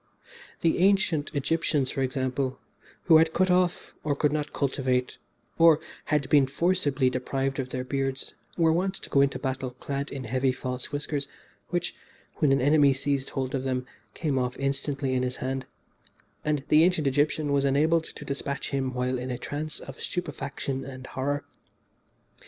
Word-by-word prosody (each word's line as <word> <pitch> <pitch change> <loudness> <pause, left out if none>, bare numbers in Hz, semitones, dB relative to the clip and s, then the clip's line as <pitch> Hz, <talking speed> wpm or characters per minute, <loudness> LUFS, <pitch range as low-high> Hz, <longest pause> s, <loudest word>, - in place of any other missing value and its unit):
The 165 - +2
ancient 185 -5 +3
Egyptians, 145 -2 +1
for 135 - -2
example, 130 0 -1 0.5
who 165 -2 +7
had 160 0 +4
cut 185 +1 +3
off, 180 -1 +1
or 145 -2 +1
could 150 0 +2
not 150 -1 -2
cultivate, 130 -2 0 0.4
or 165 -2 +7 0.3
had 150 -2 +1
been 140 -3 +5
forcibly 145 -3 +1
deprived 135 +2 -1
of 130 -1 -2
their 130 -1 -3
beards, 135 0 -2 0.2
were 165 -2 +4
wont 190 +3 0
to - - -9
go 140 - +5
into 140 0 +2
battle 130 -1 -2
clad 140 +3 -4
in 135 -1 -5
heavy 130 +2 +1
false 125 +1 -4
whiskers, 145 -1 -2 0.4
which, 175 0 -1 0.4
when 150 -4 +3
an 135 - +3
enemy 145 0 +5
seized 135 0 -1
hold 130 -1 -3
of 135 -1 -1
them, 130 -1 -1 0.3
came 145 -5 0
off 125 0 -2
instantly 135 0 -1
in 130 - +1
his 125 0 -1
hand, 130 0 -3 0.8
and 150 -2 0
the 155 +1 +7
ancient 175 -3 +2
Egyptian 145 +2 +1
was 140 -1 +3
enabled 155 +4 +3
to - - -10
despatch 140 0 -3
him 130 -2 -1
while 125 0 0
in 125 +1 -4
a 125 - -2
trance 150 +4 -4
of 135 - -10
stupefaction 140 -5 -3
and 130 -1 -8
horror. 140 +2 -2
140 Hz, 170 wpm, -27 LUFS, 130-150 Hz, 0.8 s, who